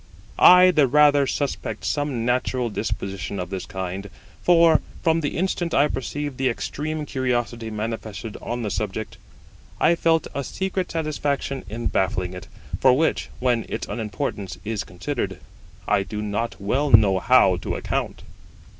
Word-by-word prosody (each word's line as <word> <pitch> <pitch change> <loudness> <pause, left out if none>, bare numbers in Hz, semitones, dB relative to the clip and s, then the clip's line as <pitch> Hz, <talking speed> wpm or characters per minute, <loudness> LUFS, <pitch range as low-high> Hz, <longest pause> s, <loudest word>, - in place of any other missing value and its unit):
I 180 0 +8
the 150 -6 +4
rather 145 0 +5
suspect 130 -6 -3
some 145 -6 -1
natural 125 -1 0
disposition 100 -2 -4
of 90 0 -5
this 95 -2 -4
kind; 95 +1 -5 0.3
for, 170 -2 +5 0.2
from 165 0 +3
the 145 - -2
instant 175 -1 -1
I 145 +2 +5
perceived 145 +1 -4
the 130 -1 +2
extreme 150 +5 -3
curiosity 120 -4 -2
manifested 110 0 -5
on 120 +1 -4
the 105 - -2
subject, - - -4 0.6
I 170 - +5
felt 165 -1 +2
a 140 - -2
secret 190 +5 -3
satisfaction 145 -4 -2
in 115 +2 -5
baffling 90 -1 0
it, 90 - -9 0.3
for 130 -1 +5
which, 160 +2 0
when 125 -2 +1
its - - -4
unimportance 105 -3 -4
is 110 -1 -2
considered, 95 - -4 0.5
I 105 -1 +3
do 105 +2 -5
not 105 +3 -3
well 130 +9 0
know 105 -5 +6
how 110 -6 +5
to - - -4
account. - - -3
125 Hz, 145 wpm, -23 LUFS, 105-145 Hz, 0.6 s, I